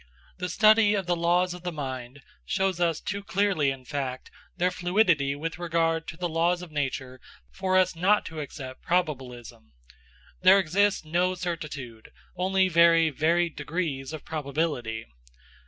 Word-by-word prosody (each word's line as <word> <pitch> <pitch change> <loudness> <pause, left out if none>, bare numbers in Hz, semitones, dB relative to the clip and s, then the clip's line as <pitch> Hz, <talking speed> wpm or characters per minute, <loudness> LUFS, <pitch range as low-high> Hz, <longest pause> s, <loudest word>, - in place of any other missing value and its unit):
The 180 0 -3
study 215 +2 +5
of 195 -2 -2
the 175 0 +1
laws 175 +1 +1
of 180 - -9
the 180 0 -4
mind 130 -3 -6 0.2
shows 190 - -1
us 170 -3 +1
too 200 +1 -4
clearly, 195 -8 +1
in 135 -1 -6
fact, 130 -2 -4 0.3
their 180 0 +2
fluidity 175 -6 +2
with 165 +3 -5
regard 165 -1 0
to 165 - -7
the 180 0 -2
laws 170 +2 0
of 175 - -10
nature 130 -3 -3 0.3
for 185 - 0
us 185 -1 +3
not 195 +5 +2
to 160 -1 -7
accept 130 -3 -8
probabilism. 125 - -3 0.7
There 185 +2 +7
exists 195 +1 +1
no 180 +4 +1
certitude 150 -10 -6 0.3
only 190 +1 +2
very 165 -2 +5
varied 165 +3 +1
degrees 150 -3 -3
of 155 -2 -8
probability. 140 -7 -3
165 Hz, 150 wpm, -27 LUFS, 140-180 Hz, 0.7 s, There